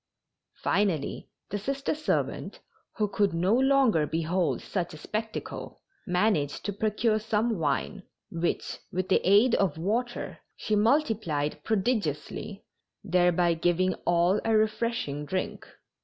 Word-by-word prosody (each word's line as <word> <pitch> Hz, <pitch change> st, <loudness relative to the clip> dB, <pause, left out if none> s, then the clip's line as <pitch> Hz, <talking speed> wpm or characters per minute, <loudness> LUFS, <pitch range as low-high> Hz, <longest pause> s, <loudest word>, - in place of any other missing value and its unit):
Finally 185 Hz, -8 st, 0 dB, 0.2 s
the 205 Hz, -, -1 dB
Sister 275 Hz, +6 st, -2 dB
servant, 305 Hz, 0 st, -2 dB, 0.4 s
who 210 Hz, -, +2 dB
could 200 Hz, -3 st, +1 dB
no 180 Hz, +5 st, +2 dB
longer 260 Hz, -, +4 dB
behold 165 Hz, +3 st, 0 dB
such 175 Hz, -4 st, -3 dB
a -, -, -9 dB
spectacle, 220 Hz, +8 st, -5 dB, 0.3 s
managed 180 Hz, -6 st, +1 dB
to 205 Hz, -, -1 dB
procure 215 Hz, +2 st, +1 dB
some 220 Hz, -1 st, 0 dB
wine, 165 Hz, +6 st, -1 dB, 0.3 s
which, 170 Hz, 0 st, -2 dB
with 185 Hz, 0 st, -2 dB
the 190 Hz, -, +4 dB
aid 205 Hz, +6 st, +5 dB
of 185 Hz, -6 st, +2 dB
water, 230 Hz, +8 st, -2 dB, 0.2 s
she 215 Hz, -, -1 dB
multiplied 210 Hz, -, +1 dB
prodigiously, 200 Hz, -, -2 dB, 0.4 s
thereby 175 Hz, -2 st, +3 dB
giving 175 Hz, +3 st, +1 dB
all 175 Hz, +3 st, +3 dB
a 225 Hz, -1 st, +3 dB
refreshing 215 Hz, -9 st, -1 dB
drink. 185 Hz, +5 st, -3 dB
200 Hz, 120 wpm, -28 LUFS, 170-220 Hz, 0.4 s, aid